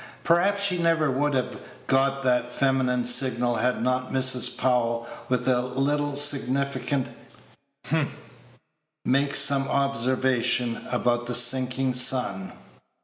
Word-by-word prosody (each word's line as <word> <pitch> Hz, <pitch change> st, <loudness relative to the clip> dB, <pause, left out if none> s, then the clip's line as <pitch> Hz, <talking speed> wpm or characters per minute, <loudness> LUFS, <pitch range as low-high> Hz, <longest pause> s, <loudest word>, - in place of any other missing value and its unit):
Perhaps 195 Hz, +4 st, +1 dB
she 185 Hz, -3 st, +1 dB
never 165 Hz, -3 st, +1 dB
would 145 Hz, +2 st, -1 dB
have 130 Hz, -, -3 dB, 0.3 s
got 135 Hz, +1 st, 0 dB
that 125 Hz, -1 st, 0 dB
feminine 130 Hz, -2 st, -1 dB
signal 120 Hz, -1 st, +2 dB
had 125 Hz, +2 st, -1 dB
not 130 Hz, 0 st, -2 dB
Mrs. 130 Hz, -2 st, +2 dB
Powell, 120 Hz, -2 st, -1 dB, 0.2 s
with 125 Hz, 0 st, -2 dB
a 125 Hz, -1 st, +1 dB
little 140 Hz, +3 st, -2 dB
significant 140 Hz, -1 st, 0 dB, 0.8 s
"hem," -, -, -2 dB, 0.9 s
made 140 Hz, +2 st, 0 dB
some 135 Hz, -1 st, +3 dB
observation 130 Hz, -3 st, 0 dB
about 120 Hz, -1 st, -1 dB
the 120 Hz, -, 0 dB
sinking 130 Hz, +2 st, +3 dB
sun. 125 Hz, -7 st, +1 dB
130 Hz, 115 wpm, -24 LUFS, 125-140 Hz, 0.9 s, some